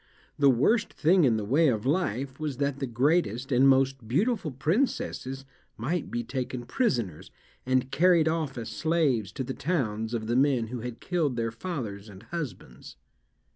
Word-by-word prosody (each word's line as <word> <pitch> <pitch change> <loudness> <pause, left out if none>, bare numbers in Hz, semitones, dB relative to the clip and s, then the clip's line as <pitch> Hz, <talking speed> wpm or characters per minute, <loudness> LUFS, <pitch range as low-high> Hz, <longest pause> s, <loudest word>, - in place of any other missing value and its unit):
The 140 -1 +6
worst 210 - +2
thing 170 +1 +3
in 115 -4 +3
the 105 - -3
way 150 +9 +3
of 110 -5 0
life 135 - -1
was 150 -4 -3
that 140 -1 -1
the 135 - -2
greatest 130 - +1
and 130 +2 +5
most 135 -3 +2
beautiful 195 - +1
princesses 140 - -1 0.3
might 150 +9 -2
be 120 - -2
taken 125 0 -4
prisoners, 120 - -1 0.4
and 130 0 +1
carried 170 -1 +4
off 160 -5 -1
as 115 - -5
slaves 150 - 0
to 130 - -3
the 130 +1 -4
towns 115 -9 -2
of 110 -1 -3
the 120 +2 -1
men 130 -4 +2
who 125 0 -5
had 120 0 -7
killed 160 -8 0
their 115 -1 -1
fathers 115 - -5
and 100 +1 -12
husbands. 115 - -7
130 Hz, 170 wpm, -27 LUFS, 115-155 Hz, 0.4 s, The